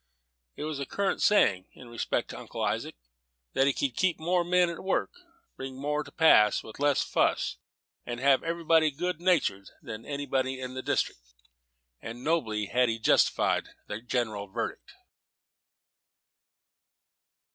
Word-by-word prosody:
It - - -6
was 155 -2 -3
a 140 - -4
current 200 -1 -1
saying, 100 - +3
in 125 - -13
respect 120 0 -2
to - - -8
Uncle - - -6
Isaac, - - -2 0.6
that 135 - +3
he 140 - +3
could 130 -3 -2
keep 185 -4 +1
more 175 +2 +1
men 180 +1 +3
at 170 -1 -6
work, 190 - 0 0.4
bring 130 0 -7
more 150 +2 -1
to 145 - -14
pass, 105 -11 +5
with 110 - -11
less 145 -1 +3
fuss, - - 0 0.5
and 120 0 -5
have 135 0 +4
everybody 165 -1 +2
good 170 +3 -3
natured, 155 - +1
than 110 0 -8
any 145 0 -4
man 130 -1 0
in 130 -1 -5
the 130 - -4
district; - - -1 0.8
and 120 +2 -8
nobly 115 -10 0
had 125 +3 +2
he 115 - -1
justified 110 - +2 0.2
the 105 +2 -6
general 110 -4 -2
verdict. 95 - -5
135 Hz, 150 wpm, -28 LUFS, 120-160 Hz, 0.8 s, pass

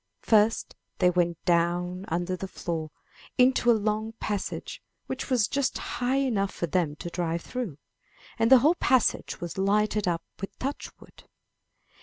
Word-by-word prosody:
First 220 0 +3 0.2
they 180 -1 +4
went 175 -2 0
down 175 +2 +1
under 175 +2 -1
the 190 +1 -5
floor 165 -4 -4 0.5
into 250 -1 +4
a - - +8
long 215 +1 -1
passage, 210 -3 -4 0.2
which - - -5
was 240 -6 +3
just 280 +2 0
high 245 +2 -2
enough 230 -8 +1
for - - -3
them 165 -2 0
to 175 +3 -7
drive 170 -1 -2
through, 235 - -5 0.6
and 225 0 +3
the 265 - +11
whole 315 - +6
passage 260 -8 +1
was 175 +2 -5
lighted 210 +1 +2
up 170 -1 0 0.2
with 195 - -7
touch 275 +2 -4
wood. - - -17
195 Hz, 155 wpm, -27 LUFS, 175-230 Hz, 0.6 s, the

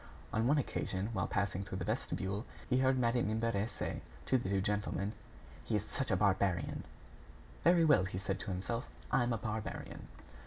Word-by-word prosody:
On 110 +2 +2
one 145 +3 +5
occasion, 100 -6 -1
while 95 -3 0
passing 100 -1 0
through 95 -1 -5
the 95 - -3
vestibule, 105 -2 -1 0.2
he 125 0 +3
heard 130 0 +4
Madame 120 -2 +2
Imbert 110 -1 +1
say - - -4 0.2
to 130 - +3
the 105 - -3
two 100 -1 +2
gentlemen: 105 0 0 0.5
"He 110 - -1
is 105 0 0
such 135 - -2
a 95 - +4
barbarian!" 95 -4 +1 0.8
"Very 170 -2 +6
well," 140 -12 +6
he 95 0 -4
said 95 +1 -2
to - - -5
himself, 100 +6 -2 0.2
"I - - +4
am 120 0 +1
a 115 - +1
barbarian." 110 0 -4
105 Hz, 185 wpm, -35 LUFS, 95-120 Hz, 0.8 s, Very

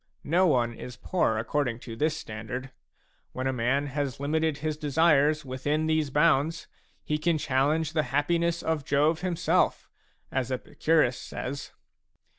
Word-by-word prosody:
No 180 +5 +3
one 120 -6 +2
is 125 +1 -9
poor 125 -8 0
accord 125 +4 0
ing 115 - -5
to 115 - -8
this 155 +5 0
standard; 125 +3 -6 0.6
when 130 - -3
a 130 - +1
man 125 +4 +1
has 140 -2 -3
limited 155 +1 0
his 155 0 -2
desires 150 0 +3
within 145 +4 -1
these 155 -2 +1
bounds, 155 +2 +2 0.4
he 150 0 -1
can 165 +1 +1
challenge 150 +3 +1
the 155 - +2
happiness 170 +4 +1
of 160 -3 -1
Jove 150 +4 +2
himself, 180 -3 +1 0.4
as 130 -1 -1
Epicurus 130 0 +1
says. 140 +2 -6
145 Hz, 145 wpm, -27 LUFS, 130-160 Hz, 0.6 s, No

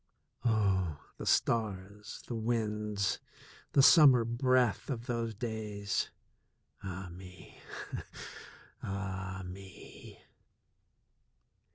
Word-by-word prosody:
Oh, 95 -9 +2 0.2
the - - -6
stars, 105 -2 0
the - - -5
winds, 105 -3 0 0.5
the 140 - +6
summer 135 -7 +8
breath 125 0 +2
of 120 -4 -3
those 115 -3 -2
days! 105 -3 -2 0.7
Ah, 95 -1 -5
me! 90 +1 -12 1.2
Ah, 95 -1 -4
me 95 +1 -11
105 Hz, 75 wpm, -32 LUFS, 95-115 Hz, 1.2 s, summer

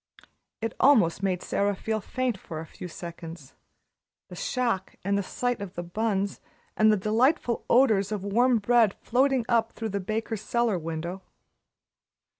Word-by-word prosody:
It 225 -1 -2
almost 215 -12 +4
made 185 -2 -1
Sara 200 0 0
feel 220 +2 -2
faint 255 +2 -1
for 165 -4 -8
a 160 - -6
few 180 - -9
seconds 165 -4 -9 0.8
the - - -9
shock 245 - -1
and 200 +2 +1
the 200 - +1
sight 245 +4 -2
of 200 -3 -7
the 175 - -4
buns 200 +2 -1 0.3
and 215 0 +5
the 215 - +3
delightful 235 - +1
odors 215 -6 +4
of 205 -3 -3
warm 240 +5 +3
bread 225 -1 +3
floating 260 0 +2
up 230 -2 +2
through 225 -1 -4
the 200 0 -2
baker's 215 +2 -3
cellar 235 -5 0
window. 165 +3 -5
215 Hz, 155 wpm, -27 LUFS, 185-235 Hz, 0.8 s, and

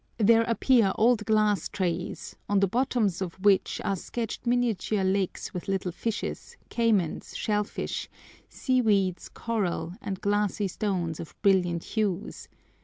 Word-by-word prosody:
There 225 +1 +5
appear 230 -3 +3
old 225 -1 +3
glass 215 -4 +2
trays, 180 -2 -3
on 200 -1 +3
the 195 - +3
bottoms 230 -5 0
of 180 -3 -3
which 195 0 +2
are 195 - +1
sketched 230 +5 -5
miniature 235 -4 +1
lakes 190 0 -1
with 180 - -6
little 190 -2 -1
fishes, 220 +5 -4
caymans, 215 -8 0
shell 210 -1 +1
fish, - - -5 0.4
seaweeds, 210 -8 +1
coral, 180 -7 -2
and 195 -2 -4
glassy 205 0 0
stones 180 -5 -2
of 160 - -9
brilliant 180 -4 +3
hues. 205 -4 -2
205 Hz, 130 wpm, -27 LUFS, 185-225 Hz, 0.4 s, There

